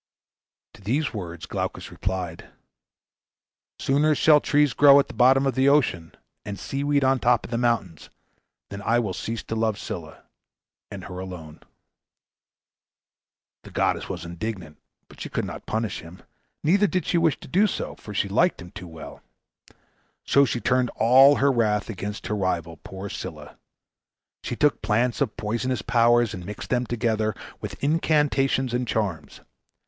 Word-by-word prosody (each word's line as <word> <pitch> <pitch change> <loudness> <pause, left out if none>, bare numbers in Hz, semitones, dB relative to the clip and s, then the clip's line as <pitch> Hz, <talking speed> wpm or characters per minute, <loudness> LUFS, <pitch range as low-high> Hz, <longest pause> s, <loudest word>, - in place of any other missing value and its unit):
To - - -16
these 130 +9 -1
words 85 -6 -6
Glaucus - - -4
replied, 95 -3 -4 1.3
"Sooner 150 +3 +2
shall 150 0 +5
trees 145 -2 +2
grow 140 0 +7
at 140 - +1
the - - -10
bottom 130 +2 +4
of 135 - +1
the 135 +1 +3
ocean, 105 - +1 0.3
and 100 -1 -6
sea 135 +7 -4
weed 145 -1 +2
on 135 0 +3
the - - -11
top 120 -1 +2
of - - -11
the 115 - -1
mountains, 115 -9 -1 0.6
than 100 0 -6
I 115 +3 +2
will 110 -6 -1
cease 115 +4 -4
to 115 - -5
love 110 -2 0
Scylla, - - -7 0.7
and 100 -2 -8
her 90 -1 -7
alone." 85 -5 -8 2.0
The - - -12
goddess - - -1
was 90 -3 -5
indignant, 85 -3 -6 0.3
but - - -15
she - - -5
could - - -2
not - - -8
punish 110 -1 -2
him, 85 +2 -13 0.4
neither 195 +6 +4
did 185 -1 -1
she 170 - +1
wish 165 -3 +1
to - - -12
do 195 +9 +3
so, - - -4
for 105 - -11
she 105 - 0
liked 145 - +2
him 90 0 -10
too 90 - -9
well; 80 -1 -11 1.0
so 140 0 +4
she 125 - -2
turned 125 0 +1
all 135 +5 +6
her 140 0 +3
wrath 110 -3 0
against 105 +1 -6
her 105 - -2
rival, 85 -4 -2
poor 95 +4 -8
Scylla. - - -8 0.9
She - - -4
took 150 -1 +2
plants 115 +5 0
of 125 -6 -1
poisonous 115 +3 -2
powers 120 -1 +3
and 90 - -7
mixed 105 +3 -8
them 125 -1 +1
together, 110 -3 -1 0.3
with - - -7
incantations 140 -4 +1
and 125 0 -1
charms. 100 -8 -3
115 Hz, 165 wpm, -24 LUFS, 95-135 Hz, 2.0 s, grow